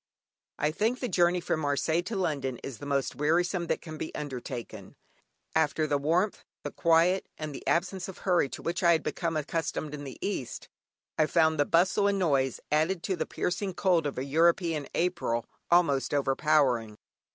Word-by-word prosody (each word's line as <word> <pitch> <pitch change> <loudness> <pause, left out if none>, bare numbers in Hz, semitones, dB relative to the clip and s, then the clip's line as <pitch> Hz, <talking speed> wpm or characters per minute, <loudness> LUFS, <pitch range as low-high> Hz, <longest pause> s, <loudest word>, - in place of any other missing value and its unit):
I 150 - +1
think 225 +9 0
the 250 - -2
journey 175 -3 +3
from 170 - -1
Marseilles 160 +3 0
to 220 - -4
London 140 -9 -1
is 135 - -7
the 145 - -7
most 140 -2 -1
wearisome 170 +5 +1
that - - -1
can 155 -2 -8
be - - -5
undertaken. 125 -4 -6 0.6
After 155 0 +2
the 145 -2 0
warmth, 170 +8 0 0.2
the - - -4
quiet, 170 +3 +3
and 155 -1 -5
the - - -7
absence 180 +2 0
of 190 - -9
hurry 175 -7 +2
to - - -8
which 170 +1 -2
I 170 -2 +5
had 160 - 0
become 165 -2 -2
accustomed 155 0 -3
in 145 -1 -6
the 135 -2 -8
East, 135 - -4 0.5
I 155 - +4
found 160 -1 +3
the 145 - +4
bustle 185 +5 +3
and 200 0 +1
noise, 135 -8 +1
added 160 +4 +1
to 190 - -1
the - - -3
piercing 190 +1 -2
cold 175 -6 +2
of 140 - -5
a 130 - -2
European 165 +1 +2
April, 170 -10 0 0.2
almost 145 -6 +3
overpowering. 135 -6 +2
160 Hz, 180 wpm, -29 LUFS, 145-175 Hz, 0.6 s, I